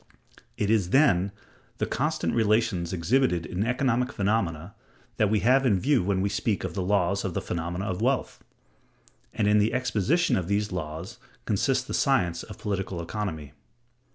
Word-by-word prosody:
It 105 Hz, 0 st, 0 dB
is, 100 Hz, -6 st, +2 dB
then, 100 Hz, -8 st, +3 dB, 0.5 s
the -, -, 0 dB
constant -, -, -1 dB
relations 110 Hz, -6 st, +1 dB
exhibited 90 Hz, 0 st, +1 dB
in 90 Hz, +3 st, -2 dB
economic 125 Hz, +1 st, 0 dB
phenomena 95 Hz, -4 st, -1 dB, 0.4 s
that 105 Hz, -, +3 dB
we 105 Hz, 0 st, +1 dB
have 130 Hz, +3 st, +4 dB
in 105 Hz, -8 st, +3 dB
view 140 Hz, +5 st, +2 dB
when 95 Hz, 0 st, 0 dB
we 100 Hz, -, +1 dB
speak 100 Hz, +1 st, -1 dB
of -, -, -4 dB
the 95 Hz, -, -2 dB
laws 100 Hz, 0 st, +1 dB
of 95 Hz, -3 st, -3 dB
the -, -, +1 dB
phenomena 85 Hz, +3 st, -4 dB
of 95 Hz, -3 st, -3 dB
wealth; -, -, -1 dB, 0.9 s
and 105 Hz, -, 0 dB
in 105 Hz, 0 st, +4 dB
the 105 Hz, +2 st, +1 dB
exposition 130 Hz, -, +1 dB
of 90 Hz, -3 st, -2 dB
these 100 Hz, +1 st, 0 dB
laws 90 Hz, +6 st, -6 dB, 0.3 s
consists 130 Hz, +5 st, +1 dB
the -, -, -6 dB
science 90 Hz, -, +1 dB
of 105 Hz, -3 st, -10 dB
political 95 Hz, -3 st, -3 dB
economy." 85 Hz, -5 st, -5 dB
100 Hz, 165 wpm, -26 LUFS, 90-115 Hz, 0.9 s, have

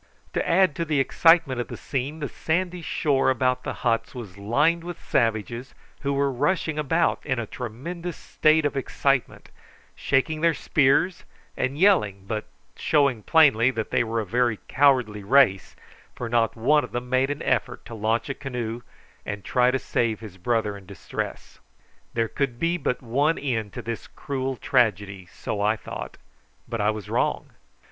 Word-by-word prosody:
To -, -, -1 dB
add 175 Hz, -3 st, +4 dB
to 170 Hz, -, 0 dB
the 155 Hz, -3 st, 0 dB
excitement 145 Hz, -1 st, +4 dB
of -, -, -6 dB
the -, -, -7 dB
scene 145 Hz, +4 st, -4 dB
the 145 Hz, -, -1 dB
sandy 180 Hz, +4 st, -2 dB
shore 145 Hz, -4 st, +1 dB
about 130 Hz, 0 st, +1 dB
the -, -, -3 dB
huts 115 Hz, +2 st, 0 dB
was 110 Hz, -7 st, -8 dB
lined 145 Hz, +12 st, +1 dB
with 175 Hz, -1 st, -7 dB
savages, 115 Hz, +2 st, -1 dB, 0.2 s
who 140 Hz, -, -2 dB
were 140 Hz, 0 st, +1 dB
rushing 155 Hz, +3 st, 0 dB
about 165 Hz, +3 st, +1 dB
in 130 Hz, -3 st, -1 dB
a 115 Hz, -, -2 dB
tremendous 150 Hz, -, -6 dB
state 155 Hz, 0 st, +2 dB
of 145 Hz, -, 0 dB
excitement, 135 Hz, 0 st, -1 dB, 0.5 s
shaking 155 Hz, +3 st, 0 dB
their 165 Hz, -2 st, +3 dB
spears 155 Hz, +7 st, +2 dB, 0.3 s
and 135 Hz, +2 st, -2 dB
yelling, 105 Hz, -, +3 dB
but 105 Hz, +1 st, -3 dB, 0.3 s
showing 140 Hz, -7 st, +2 dB
plainly 130 Hz, -5 st, +5 dB
that 110 Hz, -4 st, -4 dB
they -, -, +3 dB
were 115 Hz, 0 st, -2 dB
a 110 Hz, -, -2 dB
very 120 Hz, +2 st, +1 dB
cowardly 125 Hz, -7 st, +3 dB
race, 120 Hz, -4 st, +3 dB, 0.4 s
for 120 Hz, -, -4 dB
not 115 Hz, -1 st, +1 dB
one 145 Hz, +6 st, +3 dB
of -, -, -8 dB
them 120 Hz, +1 st, -3 dB
made 130 Hz, +2 st, +2 dB
an 145 Hz, 0 st, -3 dB
effort 120 Hz, -, -1 dB
to -, -, -9 dB
launch 110 Hz, +1 st, 0 dB
a 135 Hz, -, -2 dB
canoe 120 Hz, -4 st, -5 dB, 0.4 s
and 100 Hz, -1 st, -6 dB
try 125 Hz, 0 st, +3 dB
to 130 Hz, -, +1 dB
save 115 Hz, -4 st, -1 dB
his 105 Hz, -4 st, -10 dB
brother 110 Hz, 0 st, 0 dB
in 100 Hz, -2 st, -13 dB
distress. 100 Hz, -3 st, -6 dB, 0.6 s
There 115 Hz, -1 st, +1 dB
could 135 Hz, -1 st, -2 dB
be 170 Hz, +3 st, +1 dB
but 130 Hz, -7 st, -2 dB
one 140 Hz, +7 st, +1 dB
end 115 Hz, -7 st, -2 dB
to -, -, -6 dB
this 115 Hz, -1 st, -5 dB
cruel 135 Hz, -2 st, -4 dB
tragedy, 100 Hz, -8 st, 0 dB
so 105 Hz, +1 st, -5 dB
I 105 Hz, +2 st, +2 dB
thought; -, -, -8 dB, 0.5 s
but 115 Hz, -2 st, -3 dB
I 105 Hz, -, +3 dB
was 105 Hz, -2 st, -4 dB
wrong. -, -, -1 dB
130 Hz, 170 wpm, -25 LUFS, 115-145 Hz, 0.6 s, plainly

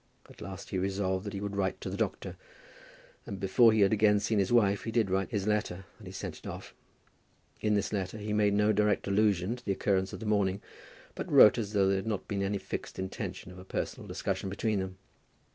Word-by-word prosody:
At -, -, -16 dB
last 95 Hz, 0 st, -8 dB
he 95 Hz, -, 0 dB
resolved 95 Hz, 0 st, -1 dB
that 105 Hz, -, -5 dB
he 100 Hz, -, -4 dB
would 100 Hz, -1 st, -4 dB
write 95 Hz, -1 st, -1 dB
to -, -, -4 dB
the -, -, -3 dB
doctor; -, -, -3 dB, 0.9 s
and 100 Hz, -, -5 dB
before 110 Hz, +5 st, +5 dB
he 110 Hz, -1 st, +2 dB
had 100 Hz, +1 st, +5 dB
again 105 Hz, -1 st, +4 dB
seen 105 Hz, +1 st, 0 dB
his 95 Hz, -1 st, +1 dB
wife, 100 Hz, -4 st, +3 dB
he 115 Hz, -, -3 dB
did 110 Hz, -4 st, +1 dB
write 95 Hz, +1 st, 0 dB
his 105 Hz, -5 st, -2 dB
letter, 105 Hz, -3 st, -1 dB
and -, -, -12 dB
he -, -, -7 dB
sent -, -, -6 dB
it -, -, -11 dB
off. -, -, -8 dB, 0.9 s
In 105 Hz, -1 st, +1 dB
this 100 Hz, +1 st, -1 dB
letter 100 Hz, +1 st, -2 dB
he 105 Hz, 0 st, -4 dB
made 105 Hz, -1 st, +3 dB
no 105 Hz, +1 st, +3 dB
direct 105 Hz, -1 st, +2 dB
allusion 100 Hz, 0 st, +2 dB
to -, -, -15 dB
the 100 Hz, -, 0 dB
occurrence 95 Hz, -1 st, 0 dB
of -, -, -7 dB
the 110 Hz, -, -7 dB
morning, 100 Hz, -2 st, +1 dB, 0.5 s
but -, -, -6 dB
wrote 105 Hz, -, +8 dB
as 105 Hz, -2 st, -4 dB
though 100 Hz, -2 st, +3 dB
there 95 Hz, 0 st, +2 dB
had 95 Hz, -, -4 dB
not 105 Hz, -4 st, -2 dB
been 100 Hz, -1 st, -2 dB
any 100 Hz, +1 st, 0 dB
fixed -, -, -6 dB
intention 95 Hz, -1 st, -5 dB
of 90 Hz, -, -11 dB
a -, -, -10 dB
personal -, -, -4 dB
discussion 95 Hz, -, -3 dB
between 105 Hz, +1 st, -1 dB
them. 95 Hz, 0 st, -5 dB
100 Hz, 230 wpm, -30 LUFS, 95-105 Hz, 0.9 s, wrote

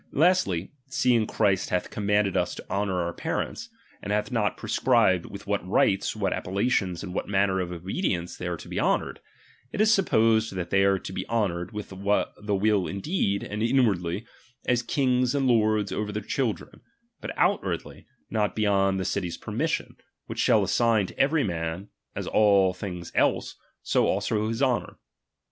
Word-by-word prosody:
Lastly, 145 Hz, -, +2 dB, 0.2 s
seeing 120 Hz, -3 st, +2 dB
Christ 100 Hz, -3 st, +1 dB
hath 90 Hz, -, -1 dB
com 105 Hz, -1 st, -4 dB
manded 105 Hz, -2 st, +2 dB
us -, -, 0 dB
to -, -, -10 dB
honour 100 Hz, -2 st, 0 dB
our 85 Hz, 0 st, -3 dB
parents, 230 Hz, -, -3 dB, 0.3 s
and 100 Hz, -, -4 dB
hath 105 Hz, +4 st, 0 dB
not 105 Hz, -4 st, 0 dB
prescribed 115 Hz, -8 st, +2 dB
with 100 Hz, 0 st, -9 dB
what 100 Hz, -2 st, -1 dB
rites, 95 Hz, +2 st, +2 dB
what 100 Hz, -3 st, 0 dB
appellations, 95 Hz, -2 st, -1 dB
and 90 Hz, -, -6 dB
Tvhat -, -, -3 dB
manner 95 Hz, -1 st, +2 dB
of 90 Hz, -1 st, -3 dB
obedience 90 Hz, -, -2 dB
they 90 Hz, -, -5 dB
are 85 Hz, -1 st, -2 dB
to -, -, -11 dB
be -, -, -3 dB
honoured; -, -, 0 dB, 0.5 s
it -, -, -5 dB
is 215 Hz, 0 st, +5 dB
to 195 Hz, -, +3 dB
be -, -, -6 dB
supposed 110 Hz, -2 st, +3 dB
that 90 Hz, -2 st, -4 dB
they 95 Hz, 0 st, +4 dB
are 100 Hz, 0 st, +3 dB
to 95 Hz, -, -8 dB
be -, -, -5 dB
honoured 95 Hz, -6 st, -1 dB
T^ith 100 Hz, -1 st, -1 dB
the 105 Hz, -1 st, 0 dB
will 100 Hz, -1 st, +2 dB
indeed, 100 Hz, -, -1 dB
and 105 Hz, +1 st, -5 dB
inwardly, 110 Hz, -6 st, +1 dB, 0.4 s
as 125 Hz, -1 st, +2 dB
kings 125 Hz, 0 st, +1 dB
and 140 Hz, -1 st, +1 dB
lords 110 Hz, -3 st, +2 dB
over 105 Hz, 0 st, -2 dB
their 105 Hz, 0 st, -4 dB
children, 120 Hz, -1 st, -3 dB, 0.4 s
but -, -, -5 dB
outwardly, -, -, -1 dB, 0.2 s
not 105 Hz, -2 st, 0 dB
be 110 Hz, -, 0 dB
yond 95 Hz, -2 st, +2 dB
the 95 Hz, -, -2 dB
city's 90 Hz, -4 st, -2 dB
permission, -, -, -3 dB, 0.3 s
which -, -, -7 dB
shall -, -, +4 dB
assign 115 Hz, -4 st, +2 dB
to -, -, -11 dB
every 145 Hz, +2 st, +3 dB
man, 85 Hz, 0 st, -3 dB, 0.3 s
as -, -, -3 dB
all 100 Hz, -3 st, +4 dB
things 90 Hz, -3 st, -6 dB
else, -, -, +1 dB, 0.3 s
so -, -, +2 dB
also 110 Hz, -1 st, 0 dB
his 115 Hz, +4 st, -1 dB
honour. 125 Hz, -3 st, 0 dB
105 Hz, 180 wpm, -26 LUFS, 95-115 Hz, 0.5 s, is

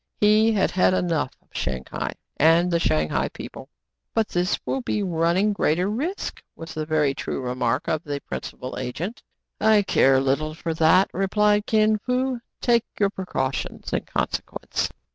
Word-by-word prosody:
He 215 Hz, +2 st, +5 dB
had 200 Hz, -2 st, +2 dB
had 185 Hz, 0 st, +3 dB
enough 165 Hz, -7 st, 0 dB
of -, -, -39 dB
Shang 65 Hz, 0 st, -3 dB
hai -, -, -3 dB, 0.2 s
and 170 Hz, +3 st, +4 dB
the 170 Hz, -, +2 dB
Shang 75 Hz, -, +1 dB
hai -, -, 0 dB
people. -, -, -9 dB, 0.5 s
"But 225 Hz, -2 st, +2 dB
this 180 Hz, +1 st, 0 dB
will 270 Hz, -, -1 dB
be 210 Hz, -4 st, -1 dB
running 175 Hz, +3 st, +2 dB
greater 180 Hz, -1 st, +1 dB
risks," 290 Hz, -, -3 dB
was 165 Hz, 0 st, -8 dB
the 155 Hz, -1 st, -4 dB
very 150 Hz, -3 st, +2 dB
true -, -, -4 dB
remark 125 Hz, -1 st, -1 dB
of 155 Hz, +1 st, 0 dB
the 145 Hz, -2 st, -3 dB
principal 130 Hz, -2 st, -6 dB
agent. 175 Hz, -, -4 dB, 0.4 s
"I 215 Hz, -1 st, +5 dB
care 135 Hz, -8 st, +4 dB
little 140 Hz, +4 st, 0 dB
for 165 Hz, 0 st, -3 dB
that," 165 Hz, +4 st, +4 dB
replied 205 Hz, +2 st, +2 dB
Kin 215 Hz, -1 st, +3 dB
Fo. 255 Hz, +2 st, -1 dB, 0.2 s
"Take 235 Hz, -2 st, +3 dB
your 200 Hz, -1 st, +3 dB
precautions 135 Hz, -9 st, -3 dB
in -, -, -1 dB
consequence." -, -, -2 dB
180 Hz, 160 wpm, -24 LUFS, 155-210 Hz, 0.5 s, He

